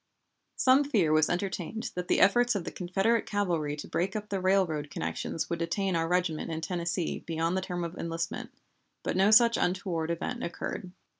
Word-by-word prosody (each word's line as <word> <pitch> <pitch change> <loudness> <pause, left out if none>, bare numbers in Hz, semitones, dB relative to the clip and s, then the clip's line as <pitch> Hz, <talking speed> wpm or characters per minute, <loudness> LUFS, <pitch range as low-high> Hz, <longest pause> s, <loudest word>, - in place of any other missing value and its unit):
Some 265 +2 +5
fear 205 - +2
was 155 0 +4
entertained 195 +4 -3
that 180 0 -4
the - - +3
efforts 240 +3 +4
of 195 - -1
the - - -5
Confederate 195 +6 0
cavalry 170 -8 0
to 145 - -7
break 190 +3 -1
up 210 0 -4
the 195 -2 -2
railroad 180 -6 +1
connections 160 - -3
would 170 - -3
detain 185 +2 -1
our 165 0 +1
regiment 175 -2 0
in 160 -1 -3
Tennessee 175 0 -2
beyond 165 +1 -1
the 190 - 0
term 180 -2 -3
of 170 +1 -5
enlistment, 165 0 -4 0.5
but - - -1
no 190 +2 +4
such 230 +1 +6
untoward 180 -3 -1
event 240 +9 -3
occurred. 180 +1 -5
180 Hz, 180 wpm, -29 LUFS, 165-200 Hz, 0.5 s, such